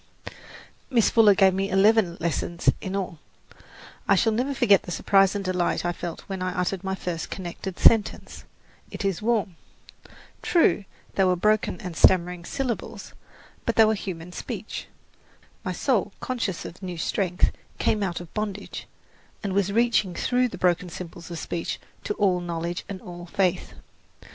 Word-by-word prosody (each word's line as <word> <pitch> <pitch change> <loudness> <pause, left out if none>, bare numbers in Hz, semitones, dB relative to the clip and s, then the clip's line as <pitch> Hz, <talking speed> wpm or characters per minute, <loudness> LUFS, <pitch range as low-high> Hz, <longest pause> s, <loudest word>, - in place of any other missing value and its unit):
Miss 235 -5 +3
Fuller 215 -3 +6
gave 190 -1 +5
me 195 +1 -1
eleven 195 -2 +4
lessons 170 +1 +1
in 190 +1 -4
all. 185 -5 -3 0.9
I 200 - +5
shall 225 +4 +3
never 250 +6 0
forget 200 -7 +5
the - - -11
surprise 195 +2 +3
and 200 -1 -3
delight 180 -1 0
I 175 - +1
felt 170 -1 -6
when 190 -2 -6
I 185 0 -2
uttered 180 +1 -1
my 190 0 -1
first 175 -4 -4
connected 185 0 -6
sentence, 225 -2 +3 0.5
"It - - -5
is 195 -1 0
warm." 210 -6 0 0.8
True, 325 - +3 0.3
they 195 - +2
were 185 -1 +3
broken 210 0 +1
and 180 -3 -6
stammering 180 0 +3
syllables; 260 -2 -4 0.5
but - - -1
they 225 - +7
were 215 - +3
human 180 -4 -6
speech. - - -6 0.8
My - - -2
soul, - - 0
conscious 230 -8 -3
of 175 - -9
new 180 -2 -5
strength, 180 +2 +1 0.3
came 215 - +1
out 180 -4 -1
of 175 -2 -11
bondage, 205 -2 -4 0.6
and 200 -2 -2
was 200 0 +1
reaching 220 -5 +2
through 250 0 +2
those - - -9
broken 180 0 +2
symbols 170 0 -8
of 170 - -5
speech 165 +1 -3 0.3
to 210 - -1
all 185 -3 +2
knowledge 170 0 -4
and 195 -2 -5
all 175 0 -9
faith. 190 -1 0
190 Hz, 160 wpm, -25 LUFS, 175-205 Hz, 0.9 s, they